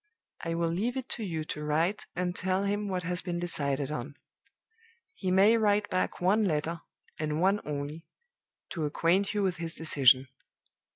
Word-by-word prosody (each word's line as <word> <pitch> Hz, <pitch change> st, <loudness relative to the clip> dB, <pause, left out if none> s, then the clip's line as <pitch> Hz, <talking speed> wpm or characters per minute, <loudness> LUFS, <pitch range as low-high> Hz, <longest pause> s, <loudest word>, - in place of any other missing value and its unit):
I 165 Hz, 0 st, -2 dB
will 165 Hz, 0 st, 0 dB
leave 225 Hz, +9 st, -1 dB
it 260 Hz, -, -4 dB
to 230 Hz, -, -4 dB
you 165 Hz, -5 st, -3 dB
to 150 Hz, -1 st, -5 dB
write 160 Hz, +7 st, 0 dB
and 180 Hz, 0 st, -1 dB
tell 190 Hz, +1 st, 0 dB
him 205 Hz, +1 st, -1 dB
what 185 Hz, -2 st, -2 dB
has 180 Hz, +1 st, +1 dB
been 175 Hz, -2 st, -3 dB
decided 145 Hz, -5 st, -1 dB
on. 140 Hz, 0 st, -5 dB, 1.0 s
He 190 Hz, -, -3 dB
may 200 Hz, +5 st, +5 dB
write 210 Hz, -1 st, +2 dB
back 185 Hz, -, 0 dB
one 195 Hz, +5 st, +3 dB
letter, 165 Hz, -1 st, -1 dB, 0.4 s
and 155 Hz, 0 st, -1 dB
one 195 Hz, +4 st, +3 dB
only, 150 Hz, +2 st, -5 dB, 0.6 s
to 160 Hz, -4 st, -2 dB
acquaint 180 Hz, +7 st, +1 dB
you 205 Hz, -, +1 dB
with 185 Hz, -2 st, 0 dB
his 165 Hz, 0 st, -5 dB
decision. 135 Hz, -4 st, +4 dB
175 Hz, 170 wpm, -29 LUFS, 155-195 Hz, 1.0 s, may